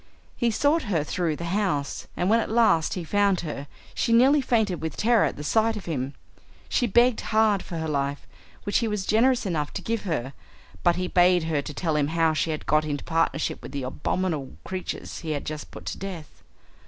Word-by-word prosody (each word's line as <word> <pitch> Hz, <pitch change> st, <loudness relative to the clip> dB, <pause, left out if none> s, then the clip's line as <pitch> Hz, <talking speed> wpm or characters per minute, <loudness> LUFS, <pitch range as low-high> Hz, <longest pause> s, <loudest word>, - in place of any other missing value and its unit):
He 240 Hz, -, +1 dB
sought 290 Hz, +8 st, +2 dB
her 165 Hz, -7 st, +1 dB
through 165 Hz, 0 st, -1 dB
the 170 Hz, -, -6 dB
house, 185 Hz, -9 st, -1 dB
and 180 Hz, -, 0 dB
when 225 Hz, +3 st, +4 dB
at -, -, -2 dB
last 220 Hz, -8 st, +3 dB
he 180 Hz, -, -4 dB
found 200 Hz, +2 st, +2 dB
her, 145 Hz, -3 st, -5 dB, 0.3 s
she -, -, 0 dB
nearly 265 Hz, +5 st, +5 dB
fainted 220 Hz, -8 st, +1 dB
with 160 Hz, -2 st, -4 dB
terror 230 Hz, 0 st, +4 dB
at -, -, -2 dB
the 150 Hz, -, -7 dB
sight 220 Hz, +7 st, +2 dB
of 200 Hz, -, -8 dB
him. 140 Hz, -4 st, -3 dB, 0.5 s
She 245 Hz, -, +1 dB
begged 240 Hz, +3 st, +4 dB
hard 215 Hz, -3 st, +2 dB
for 170 Hz, -, -6 dB
life, 140 Hz, -1 st, -2 dB, 0.4 s
which 205 Hz, -, +1 dB
he 230 Hz, -, 0 dB
was 210 Hz, -3 st, -2 dB
generous 245 Hz, +3 st, +3 dB
enough 155 Hz, -6 st, -1 dB
to -, -, -4 dB
give 230 Hz, -1 st, -1 dB
her, 140 Hz, -7 st, -2 dB, 0.5 s
but 175 Hz, -1 st, +3 dB
he 180 Hz, 0 st, -2 dB
bade 180 Hz, -1 st, +4 dB
her 160 Hz, -3 st, 0 dB
to 150 Hz, -, -7 dB
tell 160 Hz, -2 st, -1 dB
him 145 Hz, -1 st, +2 dB
how 165 Hz, 0 st, +2 dB
she 155 Hz, -, 0 dB
had 155 Hz, -1 st, -3 dB
got 155 Hz, 0 st, +3 dB
into 145 Hz, -2 st, -3 dB
partnership 165 Hz, -1 st, 0 dB
with -, -, -9 dB
the 140 Hz, -2 st, -3 dB
abominable 150 Hz, +2 st, -2 dB
creatures 185 Hz, -1 st, -5 dB
he 160 Hz, -2 st, -3 dB
had 145 Hz, -, -4 dB
just 155 Hz, 0 st, -5 dB
put -, -, -11 dB
to -, -, -5 dB
death. 180 Hz, -6 st, -8 dB
175 Hz, 210 wpm, -25 LUFS, 155-215 Hz, 0.5 s, nearly